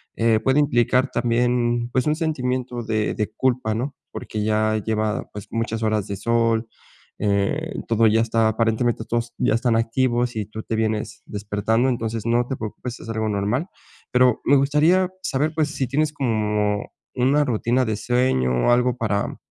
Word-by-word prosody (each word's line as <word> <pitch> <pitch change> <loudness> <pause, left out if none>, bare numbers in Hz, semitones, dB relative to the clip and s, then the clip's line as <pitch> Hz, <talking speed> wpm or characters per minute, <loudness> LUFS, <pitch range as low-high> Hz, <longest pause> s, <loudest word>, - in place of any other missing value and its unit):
eh, 115 -1 +3
puede 130 +6 +2
implicar 125 -1 +2
también, 120 0 +1
pues, 130 0 +1
un 150 - +2
sentimiento 130 -6 -2
de 110 -1 -1
de 105 0 -2
culpa, 125 -4 0
¿no? 130 +5 -3 0.2
Porque 110 - -5
ya 110 0 +1
lleva, 110 +3 -2
pues, 105 -1 -8
muchas 115 0 -2
horas 110 -2 0
de 100 - -3
sol, 115 +1 +1 0.6
eh, 100 -1 0
todo 115 0 +3
ya 110 +1 +3
está, 115 -1 +2
aparentemente, 115 +1 0
todos 120 0 -2
ya - - +2
están 115 0 +2
activos 120 +1 +1
y 110 -2 -2
tú 110 +1 -7
te 115 - -3
vienes 110 -1 -2
despertando. 105 +4 0
Entonces, 115 -3 -2
no 120 +1 +2
te 135 - -2
preocupes, 120 +2 -6
es - - -11
algo 110 -1 -1
normal. 105 - -1 0.4
Pero 125 -2 +3
me 140 - +4
gustaría 150 +7 +3
saber, 150 -2 -1
pues, 155 -2 0
si 140 -3 -2
tienes 150 +4 0
como 105 -5 -1 0.2
una 135 +4 +2
rutina 125 +1 +1
de 110 -2 -1
sueño 120 - +1 0.2
o - - +5
algo 125 0 +2
para 105 -3 -1
115 Hz, 170 wpm, -22 LUFS, 110-125 Hz, 0.6 s, o